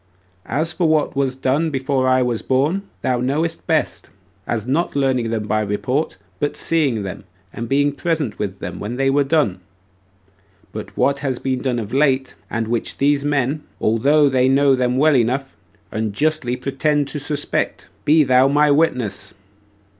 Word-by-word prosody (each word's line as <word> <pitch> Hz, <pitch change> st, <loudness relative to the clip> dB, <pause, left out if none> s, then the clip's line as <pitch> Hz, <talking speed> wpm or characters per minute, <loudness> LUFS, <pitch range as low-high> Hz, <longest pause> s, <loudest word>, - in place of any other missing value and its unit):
As 160 Hz, +4 st, 0 dB
for 175 Hz, -3 st, +1 dB
what 155 Hz, -3 st, +1 dB
was 135 Hz, -2 st, 0 dB
done 135 Hz, +5 st, 0 dB
before 135 Hz, -2 st, 0 dB
I 130 Hz, 0 st, +3 dB
was 120 Hz, -2 st, -1 dB
born, 145 Hz, +9 st, +1 dB, 0.2 s
thou 125 Hz, 0 st, +1 dB
knowest 155 Hz, +6 st, -1 dB
best, -, -, -1 dB, 0.4 s
as 110 Hz, -3 st, -2 dB
not 145 Hz, +7 st, 0 dB
learning 130 Hz, -4 st, +1 dB
them 110 Hz, -2 st, -2 dB
by 110 Hz, +1 st, 0 dB
report, 105 Hz, +9 st, -1 dB, 0.2 s
but 145 Hz, -, -1 dB
seeing 140 Hz, -10 st, 0 dB
them, 95 Hz, -, -6 dB, 0.3 s
and 115 Hz, 0 st, -5 dB
being 145 Hz, +1 st, +2 dB
present 150 Hz, -, -2 dB
with 100 Hz, -2 st, -3 dB
them -, -, -6 dB
when 105 Hz, +4 st, -4 dB
they 135 Hz, +1 st, +1 dB
were 145 Hz, +1 st, +3 dB
done; 135 Hz, -, +1 dB, 1.1 s
but -, -, -6 dB
for -, -, -25 dB
what 140 Hz, 0 st, +2 dB
has 135 Hz, -3 st, -2 dB
been 130 Hz, -1 st, -2 dB
done 130 Hz, -3 st, -1 dB
of 115 Hz, 0 st, -5 dB
late, 135 Hz, -1 st, +2 dB, 0.2 s
and 115 Hz, -1 st, -2 dB
which 115 Hz, 0 st, -2 dB
these 140 Hz, 0 st, +2 dB
men, 145 Hz, 0 st, 0 dB, 0.2 s
although 140 Hz, +7 st, +3 dB
they 130 Hz, -1 st, +3 dB
know 140 Hz, +1 st, +4 dB
them 125 Hz, -1 st, +1 dB
well 150 Hz, +1 st, +4 dB
enough, 130 Hz, +3 st, 0 dB, 0.4 s
unjustly 125 Hz, +5 st, -1 dB
pretend 140 Hz, +3 st, 0 dB
to 150 Hz, -, -3 dB
suspect, 145 Hz, 0 st, -2 dB, 0.2 s
be 155 Hz, +1 st, +5 dB
thou 130 Hz, 0 st, +4 dB
my 145 Hz, +1 st, +3 dB
witness. 125 Hz, -9 st, 0 dB
135 Hz, 170 wpm, -20 LUFS, 125-145 Hz, 1.1 s, be